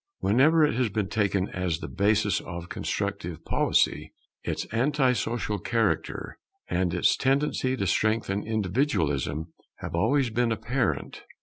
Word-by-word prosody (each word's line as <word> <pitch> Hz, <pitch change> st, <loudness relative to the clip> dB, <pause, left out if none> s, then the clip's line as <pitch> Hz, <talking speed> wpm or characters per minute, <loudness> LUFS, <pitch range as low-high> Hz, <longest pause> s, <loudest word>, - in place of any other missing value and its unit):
Whenever 150 Hz, +9 st, +4 dB
it 150 Hz, -, 0 dB
has 125 Hz, -1 st, +1 dB
been 105 Hz, -1 st, -1 dB
taken 100 Hz, -2 st, +1 dB
as 90 Hz, -3 st, -2 dB
the -, -, -7 dB
basis 105 Hz, +1 st, +2 dB
of 85 Hz, 0 st, -6 dB
a -, -, -12 dB
constructive -, -, -4 dB
policy, -, -, +1 dB, 0.3 s
its -, -, -3 dB
anti 130 Hz, +3 st, +2 dB
social 115 Hz, -3 st, -2 dB
character, 115 Hz, +4 st, -1 dB, 0.3 s
and 90 Hz, -1 st, 0 dB
its 90 Hz, 0 st, +3 dB
tendency 135 Hz, -1 st, +1 dB
to 100 Hz, -, -1 dB
strengthen 110 Hz, 0 st, +1 dB
individualism 90 Hz, -, -1 dB, 0.2 s
have -, -, -7 dB
always 120 Hz, +8 st, +2 dB
been 120 Hz, +1 st, +1 dB
apparent. 125 Hz, +3 st, -2 dB
110 Hz, 135 wpm, -27 LUFS, 95-125 Hz, 0.3 s, Whenever